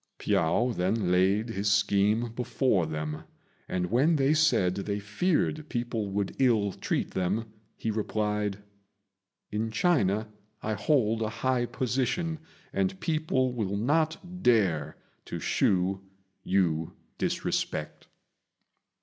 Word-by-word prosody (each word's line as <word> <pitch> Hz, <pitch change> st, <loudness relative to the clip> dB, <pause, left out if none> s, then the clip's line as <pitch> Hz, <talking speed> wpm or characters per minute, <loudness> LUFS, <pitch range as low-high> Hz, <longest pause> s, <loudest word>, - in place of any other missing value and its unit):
Piao 100 Hz, +10 st, +1 dB
then 95 Hz, +1 st, 0 dB
laid 95 Hz, +5 st, +3 dB
his 100 Hz, -1 st, 0 dB
scheme 105 Hz, +3 st, +2 dB
before 120 Hz, -, +1 dB
them, 75 Hz, 0 st, -4 dB, 0.5 s
and 90 Hz, 0 st, -1 dB
when 145 Hz, +8 st, +4 dB
they 140 Hz, 0 st, +3 dB
said 155 Hz, -13 st, +3 dB
they 100 Hz, +1 st, -3 dB
feared 150 Hz, -, 0 dB
people 120 Hz, -4 st, -2 dB
would 100 Hz, 0 st, -2 dB
ill 110 Hz, -6 st, +3 dB
treat -, -, -2 dB
them, 95 Hz, +5 st, -1 dB, 0.3 s
he 110 Hz, -, -2 dB
replied, 105 Hz, -1 st, -1 dB, 0.9 s
"In 110 Hz, +2 st, -1 dB
China 110 Hz, -, +2 dB, 0.4 s
I 110 Hz, -, -1 dB
hold 115 Hz, -1 st, +1 dB
a 110 Hz, -, 0 dB
high 125 Hz, +1 st, 0 dB
position, 135 Hz, +7 st, -1 dB, 0.3 s
and 95 Hz, -1 st, 0 dB
people 145 Hz, -, 0 dB
will 100 Hz, -4 st, -2 dB
not 160 Hz, -, 0 dB
dare 95 Hz, -, +2 dB, 0.3 s
to -, -, -5 dB
shew 95 Hz, 0 st, +1 dB, 0.4 s
you 85 Hz, -4 st, +1 dB, 0.3 s
disrespect." -, -, -2 dB
110 Hz, 115 wpm, -28 LUFS, 95-130 Hz, 0.9 s, when